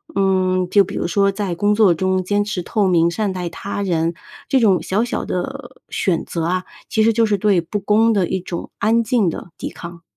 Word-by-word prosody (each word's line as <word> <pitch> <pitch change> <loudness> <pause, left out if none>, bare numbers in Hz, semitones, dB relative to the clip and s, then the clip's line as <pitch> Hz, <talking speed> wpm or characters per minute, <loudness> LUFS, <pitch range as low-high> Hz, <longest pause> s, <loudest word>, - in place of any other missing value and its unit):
嗯， 185 -2 +1
就 200 +1 +5
比 - - -7
如 - - -2
说 200 +2 +2
在 195 -3 -3
工 205 +3 +2
作 205 -5 +5
中 185 +2 0
坚 205 +2 +1
持 205 -4 -4
透 205 0 0
明， 170 -2 +3
善 205 +1 -1
待 180 -2 -4
他 200 +4 -5
人， 165 -2 0 0.4
这 270 - +3
种 200 -6 +3
小 205 +5 0
小 245 - -3
的 260 +8 -5
选 175 -4 0
择 165 -2 -3
啊， 185 +1 -1 0.2
其 220 - +2
实 225 0 +4
就 230 - +2
是 205 -2 +1
对 195 -3 +2
不 175 +6 -4
公 220 +3 +3
的 190 -4 +1
一 190 - -1
种 175 -1 -6
安 230 +2 +2
静 225 -6 +2
的 170 - -7
抵 - - -4
抗。 170 -1 -10
195 Hz, 235 characters per minute, -19 LUFS, 180-215 Hz, 0.4 s, 就